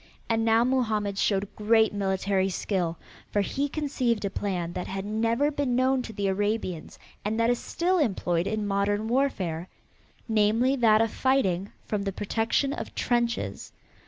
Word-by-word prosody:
And 225 -1 +1
now 225 +1 +4
Mohammed 215 -6 0
showed 200 -1 0
great 220 +1 +3
military 195 -1 0
skill, 180 -3 -1 0.3
for 205 - +2
he 280 +8 -1
conceived 260 -8 -1
a 195 - -2
plan 180 -4 -2
that 180 - -4
had 195 +1 -4
never 230 +7 +1
been 280 -4 -1
known 260 +1 +2
to 230 - -7
the 200 -2 -3
Arabians 195 -4 -2 0.3
and 215 +2 -1
that 230 +1 +3
is 245 - 0
still 360 +2 0
employed 180 - 0
in 215 -1 -1
modern 205 +2 0
warfare, 190 -10 0 0.6
namely 225 +4 +3
that 220 -3 +5
of 225 -1 +1
fighting 200 -8 +1
from 210 -2 -2
the 200 0 -2
protection 225 +8 0
of - - -6
trenches. 240 -1 -1
215 Hz, 160 wpm, -27 LUFS, 195-240 Hz, 0.6 s, that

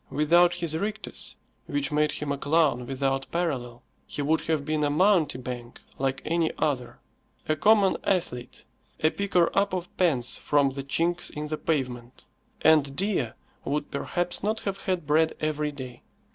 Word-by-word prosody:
Without 170 +4 +4
his 170 -3 -2
rictus, 210 +6 -3 0.3
which 290 - 0
made 150 0 +2
him 150 -1 -3
a 140 - -1
clown 145 -5 +2
without 135 0 -1
parallel, 130 -9 -2 0.2
he 145 - -3
would 160 +3 +2
have 155 -3 0
been 155 0 0
a 145 - +2
mountebank, 145 - +1 0.2
like 135 0 -1
any 165 0 +1
other; 135 -6 -1 0.5
a 155 - +2
common 205 +1 +4
athlete, 165 -10 -2 0.4
a 155 - +4
picker 185 -4 +2
up 200 -1 +2
of 180 -1 -6
pence 135 -10 +2
from 140 -2 +2
the 140 +1 -5
chinks 170 +5 0
in 150 0 -5
the 155 - -2
pavement, 125 -5 -3 0.4
and 150 -3 +4
Dea 190 - 0 0.4
would 145 +1 -2
perhaps 175 +5 -2
not 215 +2 -1
have 195 -1 -4
had 185 -5 -1
bread 160 +2 +3
every 150 -1 -1
day. 130 -4 -9
150 Hz, 160 wpm, -27 LUFS, 135-175 Hz, 0.5 s, Without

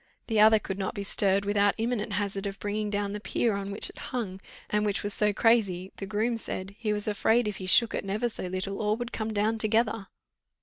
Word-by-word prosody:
The 220 -2 0
other 220 +1 +7
could 195 -2 -5
not 190 - -2
be 200 - -3
stirred 200 0 +3
without 205 0 +2
imminent 225 -2 -1
hazard 200 0 -2
of 195 0 -5
bringing 210 +1 -2
down 205 -1 -2
the 210 - -4
pier 215 +2 0
on 200 0 -3
which 200 +1 -2
it - - -11
hung, 200 -7 -4 0.3
and 210 0 0
which 205 -2 0
was 205 0 -1
so 210 0 +3
crazy, 200 -5 +2
the 195 - -6
groom 220 +3 0
said, 190 -3 -6
"he 220 -3 -1
was 210 0 -1
afraid, 220 +2 +2
if 210 - -3
he 185 - -6
shook 230 +5 +4
it - - -2
never 205 +5 -1
so 220 -5 -4
little, 185 +2 -3
all 210 +1 +1
would 240 0 -5
come 220 0 -3
down 215 +1 0
together." 220 -1 +1
210 Hz, 230 wpm, -28 LUFS, 195-220 Hz, 0.3 s, other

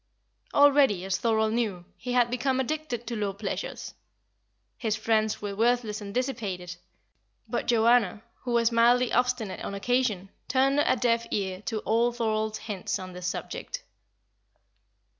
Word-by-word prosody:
Already, 280 -10 +5
as 190 -1 -1
Thorold 220 -2 +1
knew, 210 -7 -1
he 250 - -5
had 240 -1 +3
become 260 +1 0
addicted 265 -3 -3
to 235 - -4
low 205 -2 -1
pleasures. 200 0 -5 0.8
His 220 -3 -1
friends 220 -1 0
were 200 -1 -3
worthless 225 -1 +1
and 200 -1 -6
dissipated; 200 -8 -3 0.7
but - - -2
Joanna, 230 -2 +3 0.2
who 245 -2 -4
was 235 0 +3
mildly 240 +1 +4
obstinate 250 -5 0
on 200 - -4
occasion, 210 -3 0 0.2
turned 275 +1 +3
a 295 - +3
deaf 235 -1 +1
ear 190 -2 -2
to 220 -3 -2
all 235 +2 +2
Thorold's 220 -2 -1
hints 200 -2 -3
on 185 -1 -8
this 180 0 -5
subject. - - -5
230 Hz, 140 wpm, -27 LUFS, 205-245 Hz, 0.8 s, Already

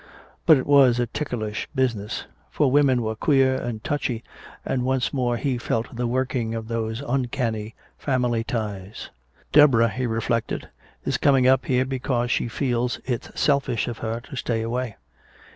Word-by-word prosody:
But 155 - +8
it 130 - -2
was 135 -4 +5
a 120 - +2
ticklish 110 -5 -4
business. 115 -6 -1 0.2
For 145 -4 +1
women 135 -4 +4
were 110 0 -2
queer 135 +2 +3
and 115 -2 -5
touchy, 130 -6 -2 0.4
and 130 -1 0
once 130 -1 0
more 120 -3 0
he 125 0 -1
felt 115 0 -2
the 120 0 -1
working 125 -2 -1
of 110 -1 -5
those 115 +2 -2
uncanny 120 -4 -2 0.2
family 125 -4 0
ties. 105 -3 -5 0.4
"Deborah," 130 -6 +6
he 125 +3 -2
reflected, 115 0 -2 0.4
"is - - 0
coming 135 -3 +4
up 130 0 +3
here 130 0 +2
because 125 -2 -1
she - - +1
feels 125 0 -1
it's 125 -3 -4
selfish 135 -6 +1
of 120 -2 -5
her 115 +1 -3
to 135 +2 -10
stay 115 -3 -1
away. 120 0 -3
120 Hz, 160 wpm, -24 LUFS, 115-130 Hz, 0.4 s, But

